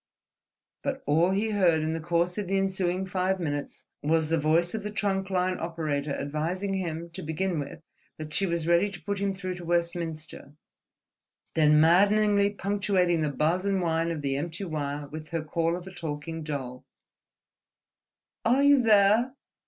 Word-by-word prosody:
But 275 -1 -3
all 160 +5 +3
he 205 +3 0
heard, 175 -6 +3
in 160 +1 -1
the 165 - -2
course 170 +2 0
of 205 - -3
the 195 +1 +1
ensuing 190 -1 0
five 190 0 0
minutes, 145 -4 -4 0.2
was 160 +1 +1
the 165 0 +2
voice 165 +3 +2
of 220 - -2
the 210 - -4
trunk 195 -2 -1
line 185 -1 0
operator 155 -3 -2
advising 165 +7 -2
him, 170 -3 -3
to 180 +3 -7
begin 160 +2 -2
with, 145 +3 -7 0.3
that 155 0 -7
she 195 +3 +1
was 170 -2 -1
ready 170 +4 +3
to 175 -4 -10
put 200 +3 -2
him 200 0 0
through 185 -1 -4
to 175 - -9
Westminster, 170 -4 -3 1.0
then 150 -1 +5
maddeningly 200 +5 +4
punctuating 195 -4 +1
the 150 - +1
buzz 160 +6 0
and 195 -1 +1
whine 165 -1 0
of 160 -3 -4
the 135 -1 0
empty 170 +5 -4
wire 145 -4 -3
with 155 +1 -8
her 165 -2 -2
call 165 +2 0
of 180 - -9
a 190 - -10
talking 160 0 -5
doll—"Are 150 - -6
you 285 -2 +6
theah?... 220 +3 +4
170 Hz, 170 wpm, -27 LUFS, 155-195 Hz, 1.0 s, you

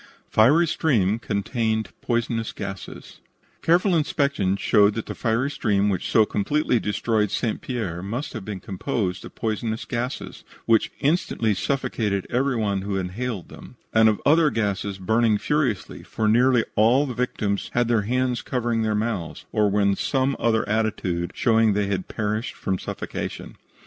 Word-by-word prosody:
FIERY 145 +10 +5
STREAM 115 - +1
CONTAINED 110 +1 -1
POISONOUS 115 -1 -1
GASES 100 -1 -8 0.4
Careful 175 +3 +3
inspection 140 - +1
showed 105 -1 +4
that 115 - -3
the - - -5
fiery 120 +4 0
stream 105 -6 +1
which 95 -3 -2
so 110 - +5
completely 125 +5 +1
destroyed 105 0 0
St. 110 +2 -2
Pierre 105 -10 -3
must 120 +10 -4
have 110 -6 -6
been 100 -1 -5
composed 95 -2 -3
of - - -12
poisonous 110 0 -2
gases, 125 +2 -4 0.2
which 115 -1 +3
instantly 140 -8 +1
suffocated 105 -4 -1
every 130 +2 +1
one 100 -4 0
who 100 0 -2
inhaled 95 +2 -4
them, - - -12 0.2
and 110 0 +6
of 105 - 0
other 155 +1 +5
gases 100 -4 -2
burning 110 +3 +2
furiously, 135 -5 -1
for 110 - -2
nearly 120 +2 +4
all 120 +7 +4
the 130 - -4
victims 110 -5 -2
had 120 -1 +2
their 115 -2 +2
hands 125 +3 0
covering 120 -3 -1
their 110 -1 0
mouths, 105 -6 -3
or 105 -1 +2
were 105 +1 +1
in 100 0 +3
some 135 +3 0
other 110 -1 +1
attitude 105 -5 -1
showing 115 -2 +3
that 105 - +1
they - - 0
had 95 -2 -2
perished 110 +2 -3
from 95 -2 -2
suffocation. - - -6
110 Hz, 160 wpm, -24 LUFS, 100-125 Hz, 0.4 s, and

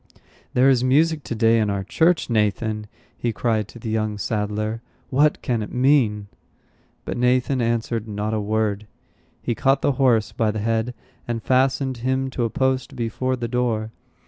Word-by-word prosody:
"There 125 +2 +5
is 130 -2 +4
music 150 +4 +3
to 120 - -3
day 115 +1 +4
in 105 -2 +1
our 100 -1 -1
church, 165 - +2
Nathan!" 105 -1 0 0.3
he 120 - -2
cried 110 -2 0
to - - -13
the 110 -1 -5
young 110 -1 -1
saddler. 105 +1 -2 0.3
"What 145 +3 +2
can 120 -5 0
it 105 - -6
mean?" 125 -6 +2 0.8
But - - -4
Nathan 125 +1 +2
answered 115 -1 -1
not 105 +1 -3
a 110 - 0
word. 105 0 -1 0.6
He 120 - 0
caught 135 +3 +1
the - - +3
horse 115 -5 +3
by 110 -2 0
the 105 - -2
head, 115 +3 -1 0.3
and 115 -2 -3
fastened 130 0 +1
him 130 +2 -1
to 120 -2 -1
a - - -1
post 130 +2 -1
before 130 +2 -1
the 120 -2 -4
door. 115 -3 -1
115 Hz, 170 wpm, -22 LUFS, 110-130 Hz, 0.8 s, There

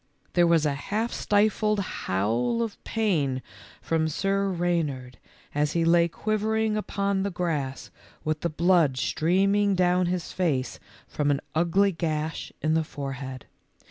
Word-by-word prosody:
There 175 -1 +4
was 165 -2 +3
a 145 - +1
half 215 +11 -2
stifled 210 0 +2
howl 120 - -1
of 220 -3 -6
pain 155 - 0 0.4
from 160 -1 +1
Sir 195 +4 0
Reynard 160 -8 -2 0.3
as 150 0 0
he 165 -1 +1
lay 170 0 +5
quivering 215 +3 0
upon 200 -2 -1
the 200 - 0
grass 160 -7 -3 0.3
with 155 0 -1
the 170 - 0
blood 165 -4 +3
streaming 195 +8 +2
down 180 0 +2
his 180 -1 -2
face 150 -8 -1 0.3
from 145 -1 -1
an 140 -1 +2
ugly 175 +5 +3
gash 160 -2 -3
in 155 0 +2
the 160 0 +2
forehead. 135 -3 -6
170 Hz, 140 wpm, -26 LUFS, 150-195 Hz, 0.4 s, lay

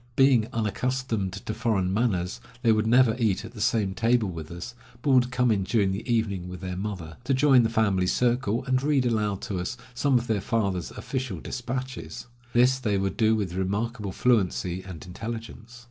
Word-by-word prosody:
Being 130 -5 +5
unaccustomed 115 -1 -1
to 100 +3 -5
foreign 95 -5 0
manners, 95 -5 0 0.2
they 115 - +5
would 110 0 +2
never 120 -1 +5
eat 110 -2 +1
at 115 - -9
the 105 - -8
same 105 -3 +1
table 115 0 +2
with 80 -3 -7
us, 85 +8 -7 0.3
but 140 - +2
would 125 -1 +4
come 125 -2 +2
in 100 -3 +1
during 100 -1 +1
the 100 +6 -3
evening 100 -6 0
with 90 -1 -7
their 90 0 -5
mother, 95 -5 -5
to 135 +2 +1
join 135 -1 +5
the 115 - +1
family 100 -5 +2
circle 120 +1 +1
and 130 -1 +1
read 140 -2 +2
aloud 105 -4 0
to 95 -3 -3
us 90 +8 -4 0.2
some 130 +1 +2
of 120 - -2
their 110 -4 0
father's 100 -6 -1
official 130 -9 -4
despatches. 125 +5 -5 0.3
This 125 +2 +4
they 105 -5 0
would 95 0 -1
do 110 -1 +3
with 100 -5 -2
remarkable 100 +3 -2
fluency 95 -6 +1
and 90 -5 -9
intelligence. 115 +4 -7
110 Hz, 190 wpm, -26 LUFS, 95-125 Hz, 0.3 s, Being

